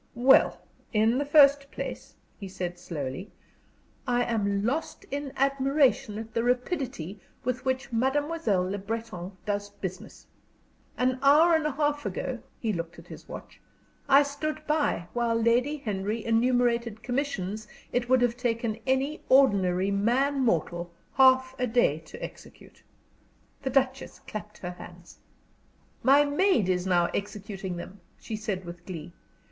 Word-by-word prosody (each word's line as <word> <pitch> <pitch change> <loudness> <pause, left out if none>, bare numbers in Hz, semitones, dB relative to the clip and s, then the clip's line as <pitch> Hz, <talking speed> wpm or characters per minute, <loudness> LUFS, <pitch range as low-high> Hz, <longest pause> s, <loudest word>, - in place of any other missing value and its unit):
"Well, 255 +3 +5 0.3
in 225 +4 +3
the 285 - -1
first 280 -1 +5
place," - - -7 0.2
he 200 - -6
said, 180 -1 -5
slowly, 165 +1 -5 0.8
"I 245 -1 +2
am 200 -4 0
lost 295 +7 -2
in 280 0 -3
admiration 275 -4 +2
at 220 0 -7
the 230 - +1
rapidity 245 - -2 0.2
with 250 0 -2
which 260 -2 -2
Mademoiselle 265 - +1
Le 200 +2 -3
Breton 200 -3 -5
does 205 -1 -2
business. 190 -2 -8 0.7
An 255 0 +1
hour 300 +5 +6
and 320 -2 +2
a 300 - -2
half 290 0 0
ago" 235 +5 -3 0.2
he 220 -3 -1
looked 170 -1 -5
at - - -12
his - - -12
watch - - -10 0.5
"I 280 +1 +7
stood 305 +2 -4
by 300 - 0
while 235 -1 +1
Lady 245 +6 +2
Henry 215 -3 -3
enumerated 235 -1 +1
commissions 220 -6 -2 0.3
it 245 0 0
would 255 -1 +4
have 240 -1 +2
taken 230 -2 -1
any 270 +3 0
ordinary 195 -8 +4
man 250 +8 +1
mortal 175 - 0 0.2
half 260 -1 +5
a 250 - +1
day 220 -10 +2
to 160 - -11
execute." - - -11 0.8
The 270 - -2
Duchess 265 0 0
clapped 210 0 -7
her 180 - -5
hands. 175 -1 -13 0.8
"My 280 +2 +6
maid 285 - +2
is 180 0 0
now 175 -2 +3
executing 200 -2 -4
them," 190 +3 -9 0.2
she 225 - -6
said, 205 -4 -4
with 175 0 -9
glee. 170 -2 -7
235 Hz, 140 wpm, -27 LUFS, 200-270 Hz, 0.8 s, I